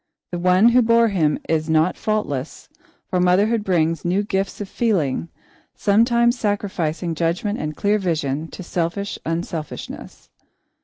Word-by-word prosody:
The 175 - -3
one 185 +5 +5
who 250 +1 +5
bore 230 0 +4
him 160 -7 +1
is 155 -1 0
not 160 +3 +3
faultless, 160 -11 -3 0.4
for 180 - 0
motherhood 205 +5 +3
brings 165 -4 +1
new 185 +4 +1
gifts 195 -1 -2
of 205 - -4
feeling, 170 - 0 0.5
sometimes 235 +3 +3
sacrificing 180 -5 -1
judgment 170 +6 -1
and 150 0 -4
clear 205 +1 +2
vision 155 -5 -1
to 185 - -9
selfish 175 +4 -3
unselfishness. 165 -1 -6
180 Hz, 135 wpm, -21 LUFS, 165-210 Hz, 0.5 s, one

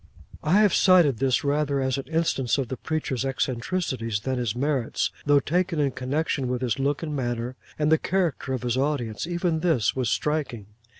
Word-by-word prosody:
I 185 +7 +4
have 205 -4 +4
cited 175 - +5
this, 135 +3 +2
rather 145 -1 +1
as 130 -1 0
an 135 - -6
instance 160 -6 0
of 135 -4 -2
the 130 - -3
preacher's 135 -4 -2
eccentricities 125 - -2
than 130 +2 -2
his 120 -3 -1
merits, 135 -2 0 0.2
though 145 -1 +6
taken 175 +2 0
in 140 -2 +2
connection 135 +1 -1
with 125 0 -2
his 120 -1 -1
look 140 +3 0
and 150 -2 -3
manner, 120 -1 -2 0.2
and 150 0 +1
the 160 - +5
character 175 -7 -1
of 125 - -3
his 120 0 0
audience, 135 -3 -1
even 175 -2 0
this 160 -10 +1
was 130 -4 0
striking. 140 -4 -1
135 Hz, 185 wpm, -25 LUFS, 125-155 Hz, 0.2 s, though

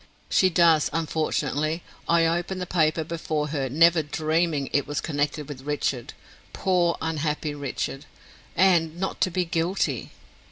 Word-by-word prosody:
"She 185 - +4
does, 165 -3 +4
unfortunately. 155 0 -1 0.3
I 170 0 +4
opened 175 +3 -1
the 180 - -3
paper 160 -2 +1
before 155 -2 -3
her, 140 -3 -2
never 165 +4 +5
dreaming 155 0 0
it 145 - +1
was 145 - -2
connected 145 -1 -2
with 140 -3 -8
Richard 140 -3 -2 0.4
poor, 180 -3 +1
unhappy 155 -1 -1
Richard! 140 0 -4 0.5
and 170 -3 +3
not 190 - -3
to - - +3
be 180 0 -1
guilty." 170 +3 -1
160 Hz, 135 wpm, -25 LUFS, 150-170 Hz, 0.5 s, never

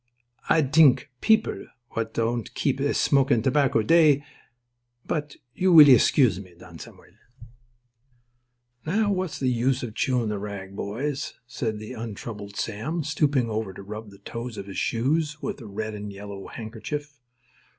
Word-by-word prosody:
Ah 160 - +5
dthink 145 -1 +4
people 220 0 +2 0.2
w'at 115 -1 -3
don't 115 0 -2
keep 135 -2 0
esmokin' 140 -3 +2
tobacco, 130 -4 +2
dthey—bot 135 -3 -1 0.2
you 185 0 +2
weel 155 -4 +10
escuse 125 - +5
me, 90 -3 -15
Don - - -13
Samuel." - - -13 1.7
"Now, 205 +7 +1
what's 185 -4 -2
the 130 - -1
use 125 +2 0
of 115 -3 -5
chewin' 125 -2 0
the 105 -1 -2
rag, 100 -1 -7
boys," 130 +9 -3
said 115 -2 -3
the 110 0 -8
untroubled 105 -2 -7
Sam, 125 +13 -3
stooping 145 -4 +1
over 110 -3 -3
to 100 - -10
rub 105 +2 -8
the 100 - -15
toes 115 +3 -7
of - - -6
his 100 -1 -5
shoes 150 +6 0
with 145 - -5
a 115 - -9
red 110 +2 -4
and 105 -1 -6
yellow 100 0 -8
handkerchief. 125 +6 -6
120 Hz, 145 wpm, -25 LUFS, 110-145 Hz, 1.7 s, weel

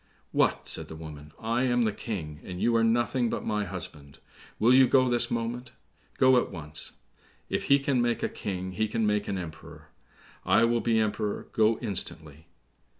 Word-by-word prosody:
"What!" - - +1
said - - +1
the 80 - -9
woman, 75 -2 -10
"I 115 +2 -1
am 120 -1 +2
the 110 - +1
King, 80 -9 -6
and 90 -1 -7
you 120 +3 +2
are 115 - +3
nothing 120 +1 +1
but - - -4
my 105 -1 -1
husband; 80 -6 -7 0.4
will 120 +3 +4
you 130 0 +7
go 130 0 +4
this 120 -1 +2
moment? 120 +1 -3 0.4
go 130 -1 +5
at - - -5
once! 75 -4 -1 0.6
If - - -1
he 140 - +5
can 140 -3 0
make 120 -1 0
a - - +2
King 95 -2 -5
he 110 +4 -1
can 110 +1 -1
make 105 0 0
an 100 - -2
emperor. 80 -3 -9 0.5
I 115 - +4
will 115 0 +2
be 115 -1 +1
Emperor; 105 -1 -2
go 110 0 +3
instantly." 80 -5 -4
110 Hz, 185 wpm, -28 LUFS, 85-120 Hz, 0.6 s, you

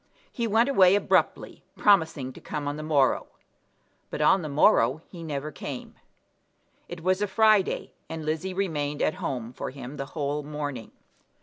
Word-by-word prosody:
He 235 -1 -2
went 225 +3 +3
away 195 -9 +5
abruptly, 205 - 0
promising 160 -10 +2
to - - -13
come 150 -2 -4
on 145 - -2
the 155 - -6
morrow; 145 -4 +2 0.8
but - - -5
on 155 +5 +4
the 155 - -5
morrow 140 0 +3
he 175 - -9
never 150 -2 -4
came. 135 -1 -7 1.0
It 175 -1 -8
was 185 +2 +1
a 205 - +1
Friday, 215 -2 +2 0.2
and 160 -1 -5
Lizzie 160 +4 -2
remained 150 -7 -1
at - - +2
home 120 -2 -4
for - - -5
him 135 +1 -9
the 135 -1 -4
whole 145 0 -1
morning. 145 -5 -5
155 Hz, 165 wpm, -26 LUFS, 140-185 Hz, 1.0 s, away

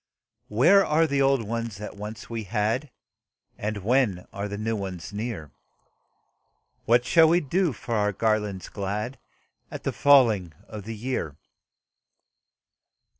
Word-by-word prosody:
Where 170 - +5
are 160 0 +3
the 140 -3 0
old 135 -5 +2
ones 115 -2 -3
that 105 0 -7
once 105 +2 -8
we 115 -2 -5
had, 110 +7 -1 0.7
And 105 -2 -4
when 110 -6 +1
are 100 +1 -3
the 105 0 -5
new 110 +2 -1
ones 95 -1 -6
near? 105 - -5 1.3
What 120 +2 +4
shall 165 -1 +6
we 170 +2 +4
do 175 +3 0
for 120 0 -6
our 105 -2 +2
garlands 105 -2 -1
glad 105 +6 -4 0.5
At - - -8
the - - -2
falling 115 - +4
of 105 -2 -8
the 115 0 -5
year?" 105 - -3
110 Hz, 135 wpm, -26 LUFS, 100-130 Hz, 1.3 s, shall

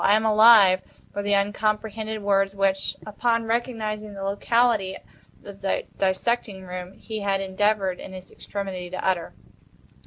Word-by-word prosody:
"I 205 - +5
am 220 +1 +1
alive," 215 -4 +7 0.3
were 205 - -2
the 205 0 +1
uncomprehended 215 +1 -1
words 195 -1 +2
which, 195 -1 0
upon 230 +2 0
recognizing 220 -3 -3
the 195 - -6
locality 205 0 +1 0.5
of 200 -1 -11
the 195 - -1
dissecting 195 +1 0
room, 180 0 -7
he 220 +1 -7
had 200 -1 0
endeavored, 195 -1 0
in - - -9
his 185 -1 -10
extremity, 190 -3 -6
to 185 - -4
utter. 180 -3 -1
200 Hz, 145 wpm, -24 LUFS, 190-215 Hz, 0.5 s, alive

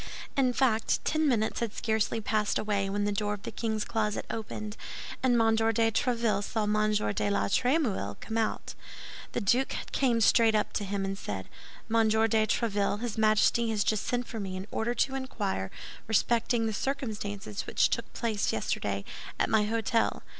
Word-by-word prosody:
In 260 -2 +3
fact, 240 -3 +1
ten 310 0 +2
minutes 220 -5 +1
had 230 -3 -2
scarcely 220 0 0
passed 215 -1 0
away 200 -2 0
when 205 +1 -1
the 205 - +1
door 210 0 -1
of 200 - -15
the - - -5
king's 220 -2 -2
closet 215 -2 -1
opened, 215 -1 -5 0.5
and 245 -2 +3
M. 225 0 +4
de 225 0 +2
Tréville 230 -3 +1
saw 220 +1 -1
M. 215 0 +2 0.2
de 205 - 0
la 200 - +1
Trémouille 235 - 0
come 220 - -6
out. 225 -1 -1 0.6
The - - -1
duke 245 +7 +2 0.2
came 245 -4 +2
straight 225 0 +5
up 210 - 0
to 205 - -2
him, 195 0 -2
and 195 0 -2
said: 95 - -5 0.4
"Monsieur 220 0 +3
de 220 0 +2
Tréville, 205 -2 0
his 235 -2 -3
Majesty 220 +1 +3
has 210 -2 +1
just 215 -2 0
sent 245 0 0
for 225 - -6
me 190 -2 -4
in 185 - -5
order 235 +2 -1
to 265 +3 +1
inquire 205 - -3 0.4
respecting 230 +1 +2
the 220 - -1
circumstances 210 -6 -3
which - - +3
took - - -2
place 220 -4 -1
yesterday - - -2 0.3
at - - +1
my 215 -1 +4
hôtel. 225 +1 0
220 Hz, 175 wpm, -29 LUFS, 205-230 Hz, 0.6 s, straight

